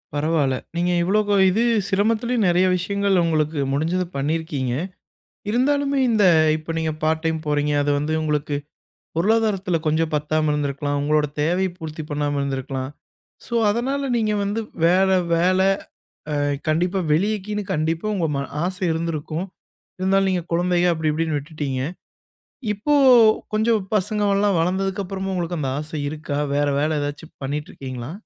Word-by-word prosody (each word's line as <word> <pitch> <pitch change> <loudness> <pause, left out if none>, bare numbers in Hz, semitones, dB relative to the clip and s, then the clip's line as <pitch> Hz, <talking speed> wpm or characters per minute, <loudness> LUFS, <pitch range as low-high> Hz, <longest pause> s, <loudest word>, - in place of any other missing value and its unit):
பரவால்ல, 145 -3 +1 0.2
நீங்க 175 +1 +1
இவ்வளோ 205 +3 +2
இது 220 +5 +1 0.2
சிரமத்திலயும், 225 +3 +1
நெறைய 180 +1 +3
விஷயங்கள் 200 0 +1
உங்களுக்கு 155 -2 0
முடிஞ்சத 165 +6 0
பண்ணிருக்கீங்க. 145 -3 -1 0.8
இருந்தாலுமே, 280 +3 +1
இந்த 215 -3 +3 0.3
இப்ப 160 +1 -6
நீங்க 160 -1 0
பார்ட் 160 +1 +1
டைம் 160 0 0
போறீங்க. 150 0 +1
அது 145 - +1
வந்து, 150 +2 -2
உங்களுக்கு 150 -1 -1 0.6
பொருளாதாரத்துல 200 -2 +1
கொஞ்சம் 155 +1 +1
பத்தாம 155 +1 +1
இருந்திருக்கலாம், 145 0 -1
உங்களோட 150 +1 +2
தேவையை 180 +5 +1
பூர்த்தி 155 -1 -6
பண்ணாம 145 -1 -1
இருந்திருக்கலாம். 135 -1 -3 0.6
சோ, 235 - -5 0.2
அதனால 270 +5 -1
நீங்க 215 -2 +1
வந்து 205 +3 -1 0.3
வேற 185 +3 +4 0.3
வேல 185 +2 +3 0.7
அ - - 0 0.3
கண்டிப்பா 175 +5 +1
வெளியிலன்னு 210 +5 0
கண்டிப்பா 160 +2 -1
உங்க 170 -4 0
ம 140 - -1 0.2
ஆசை 185 +2 -3
இருந்திருக்கும். 160 +1 -3 0.5
இருந்தாலும் 195 +1 +2
நீங்க 180 -3 0
குழந்தைக, 175 +1 +2
அப்டி, 160 -1 -1
இப்டின்னு 155 -1 -1
விட்டுட்டீங்க. 140 -3 -4 0.9
இப்போ 215 +9 -1 0.6
கொஞ்சம் 220 0 +2
பசங்க 210 +1 0
எல்லாம் 200 -1 +2
வளந்ததுக்கப்புறமும், 190 +2 -1
உங்களுக்கு 175 -1 -2
அந்த 135 -3 -1
ஆசை 155 0 -5
இருக்கா? 150 -1 -4 0.2
வேற 145 0 +2
வேலை 155 +1 +1
எதாச்சும் 145 +2 -6
பண்ணிட்டுருக்கீங்களா? 135 -2 -5
165 Hz, 130 wpm, -22 LUFS, 150-195 Hz, 0.9 s, வேற